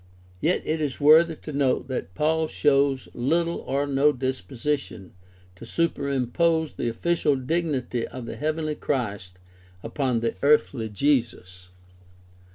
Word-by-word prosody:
Yet 175 - +1
it 155 +1 -1
is 145 -3 -2
worthy 160 +3 +6
of 155 - -17
note 140 -2 +1
that 125 -7 -4
Paul 160 +1 +1
shows 140 -3 +1
Httle 165 +7 0
or 140 +1 0
no 140 +1 +3
disposition 130 -3 -4 0.4
to 95 - -13
superimpose 155 +2 0
the 120 - -2
official 150 +4 +1
dignity 130 -4 -2
of 125 -1 -8
the - - -6
heavenly 155 0 -2
Christ 105 -11 -3 0.5
upon 125 0 -1
the 115 - 0
earthly 140 -5 +2
Jesus. 105 -7 -1
140 Hz, 125 wpm, -25 LUFS, 120-155 Hz, 0.5 s, worthy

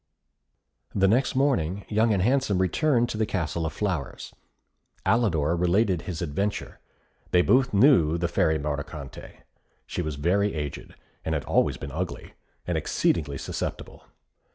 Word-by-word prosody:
The 95 -1 +4
next 125 +7 +2
morning, 100 - +1
Young 110 +2 +2
and 95 -3 +2
Handsome 125 -4 +2
returned 120 - +2
to 110 - -4
the 110 - +2
Castle 85 -4 -2
of 80 - -6
Flowers. 90 -9 -3 0.7
Alidor 85 -9 +2
related 90 +1 +2
his 85 -3 -5
adventure. 100 +7 -3 0.5
They 90 0 +4
both 130 +4 +3
knew 100 - +5
the 85 0 0
Fairy 80 -1 +2
Mordicante. 75 -1 -6 0.4
She - - -4
was 80 -4 -3
very 95 +7 +1
aged, 75 -2 -5 0.3
had 80 -3 -2
always - - +2
been - - -7
ugly, - - -5 0.3
and - - 0
exceedingly 70 -4 0
susceptible. - - -5
90 Hz, 135 wpm, -26 LUFS, 80-110 Hz, 0.7 s, knew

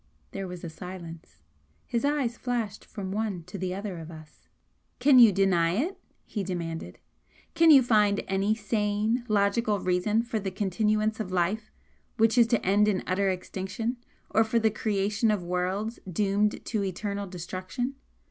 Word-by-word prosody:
There 195 -1 -5
was 180 0 -8
a 170 - -4
silence. 165 - -10 0.4
His 235 - -2
eyes 280 -5 0
flashed 235 -4 -3
from 195 -3 -6
one 205 -4 -2
to 180 +4 -8
the 185 0 -2
other 195 -3 -5
of 160 0 -9
us. 155 -2 -14 0.5
"Can 260 0 +6
you 230 -3 +9
deny 180 -3 +2
it?" 340 - -1 0.3
he 205 - -4
demanded. 170 -3 -5 0.6
"Can 330 0 +5
you 275 -4 +9
find 210 -3 +3
any 195 +3 +1
sane, 215 +2 0
logical 205 0 +2
reason 185 +5 +1
for 230 -2 -2
the 195 -1 -3
continuance 215 +3 0
of 200 -4 -4
life 190 +5 -1 0.5
which 225 0 +4
is 235 -2 +6
to 235 -1 0
end 205 +3 +4
in 200 -3 +1
utter 195 +2 +1
extinction, 190 +6 -3 0.3
or 225 - +4
for 220 +1 0
the 220 -1 +3
creation 210 +1 0
of 210 -4 0
worlds 185 +6 -2
doomed 205 +3 0
to 215 -3 -1
eternal 200 +1 -3
destruction?" 185 +8 -4
205 Hz, 160 wpm, -27 LUFS, 185-220 Hz, 0.6 s, you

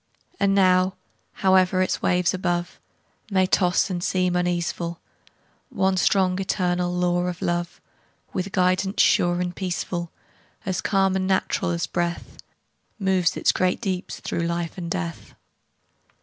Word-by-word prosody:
And 195 0 +3
now, 185 -1 +4 0.5
howe'er 185 -1 +4
its 185 - -2
waves 180 0 +2
above 175 -2 -2 0.5
May 190 -2 +3
toss 185 0 +2
and 175 -1 -3
seem 185 -1 +1
uneaseful, 175 -1 -1 0.7
One 190 0 +1
strong, 185 0 +2
eternal 180 -2 0
law 180 0 +1
of 180 -1 -4
Love, 175 0 -2 0.5
With 190 +1 -3
guidance 185 +1 +1
sure 175 0 +3
and 180 -1 -2
peaceful, 175 -2 -3 0.5
As 185 -1 -1
calm 195 -1 +2
and 185 0 0
natural 190 -2 0
as 170 -2 -1
breath, 170 +2 -3 0.6
Moves 190 -4 +1
its - - +3
great 185 0 0
deeps 190 -5 -3
through 170 0 -2
life 170 -1 -3
and 170 -2 -5
death. 85 - -5
180 Hz, 135 wpm, -24 LUFS, 175-190 Hz, 0.7 s, now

